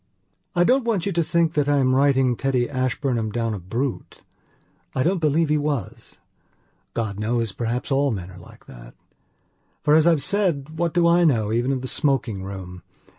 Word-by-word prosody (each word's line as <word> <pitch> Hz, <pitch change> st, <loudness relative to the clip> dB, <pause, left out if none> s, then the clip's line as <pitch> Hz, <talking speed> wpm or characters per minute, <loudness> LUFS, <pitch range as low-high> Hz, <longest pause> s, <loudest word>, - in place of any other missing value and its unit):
'" -, -, -47 dB
I 175 Hz, -, +4 dB
don't 255 Hz, +7 st, +3 dB
want 220 Hz, -7 st, -1 dB
you 200 Hz, -, -1 dB
to 170 Hz, -2 st, +1 dB
think 165 Hz, 0 st, +1 dB
that 145 Hz, -2 st, +1 dB
I 145 Hz, -, +3 dB
am 130 Hz, -2 st, +2 dB
writing 135 Hz, -2 st, +3 dB
Teddy 125 Hz, -1 st, 0 dB
Ashburnham 130 Hz, -4 st, -1 dB
down 115 Hz, 0 st, -2 dB
a 105 Hz, -, -5 dB
brute. 120 Hz, +9 st, -4 dB, 0.7 s
I 130 Hz, -, +1 dB
don't 180 Hz, +4 st, +1 dB
believe 155 Hz, 0 st, +1 dB
he 150 Hz, 0 st, +2 dB
was. 145 Hz, -8 st, -4 dB, 0.8 s
God 110 Hz, -4 st, -3 dB
knows, 115 Hz, 0 st, -1 dB
perhaps 120 Hz, +5 st, -3 dB
all 140 Hz, +1 st, +2 dB
men 95 Hz, -6 st, -5 dB
are 90 Hz, -, -12 dB
like 85 Hz, -, -16 dB
that. -, -, -13 dB, 0.9 s
For 150 Hz, -, +3 dB
as 160 Hz, +1 st, +5 dB
I've 160 Hz, -5 st, +3 dB
said 160 Hz, -5 st, -1 dB
what 170 Hz, -1 st, -1 dB
do 175 Hz, -1 st, +3 dB
I 170 Hz, +1 st, +4 dB
know 115 Hz, -10 st, +2 dB
even 120 Hz, +3 st, +1 dB
of 130 Hz, -1 st, -2 dB
the -, -, -3 dB
smoking 130 Hz, -9 st, 0 dB
room? 95 Hz, -2 st, -8 dB
135 Hz, 190 wpm, -23 LUFS, 115-155 Hz, 0.9 s, as